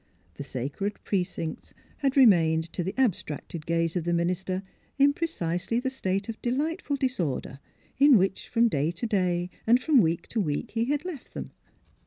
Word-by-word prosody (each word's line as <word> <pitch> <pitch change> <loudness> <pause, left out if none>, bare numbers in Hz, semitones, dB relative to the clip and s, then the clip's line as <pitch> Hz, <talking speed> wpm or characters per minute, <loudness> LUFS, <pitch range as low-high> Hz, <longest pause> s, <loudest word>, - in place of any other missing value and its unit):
The - - -9
sacred 140 - -4
precincts 180 -4 -3 0.2
had 275 -1 0
remained 165 -9 +4
to 175 - -2
the 190 - -4
abstracted 170 - -1
gaze 165 0 0
of 175 - 0
the 175 +1 0
minister 185 +2 -1 0.3
in 285 +1 +5
precisely 230 - -1
the 260 +1 -2
state 195 -6 -2
of 225 -1 -6
de 240 - -1
lightful 295 +3 -1
disorder 175 - -2 0.4
in 280 -3 +7
which, 195 0 0
from 235 0 +3
day 150 -6 0
to 170 +6 -3
day 180 -4 0 0.2
and 240 +2 +6
from 275 -1 +4
week 165 -2 0
to 225 - 0
week, 150 -6 -2
he 225 +1 0
had 290 +5 -1
left 335 -8 -8
them. - - -6
195 Hz, 175 wpm, -27 LUFS, 170-255 Hz, 0.4 s, in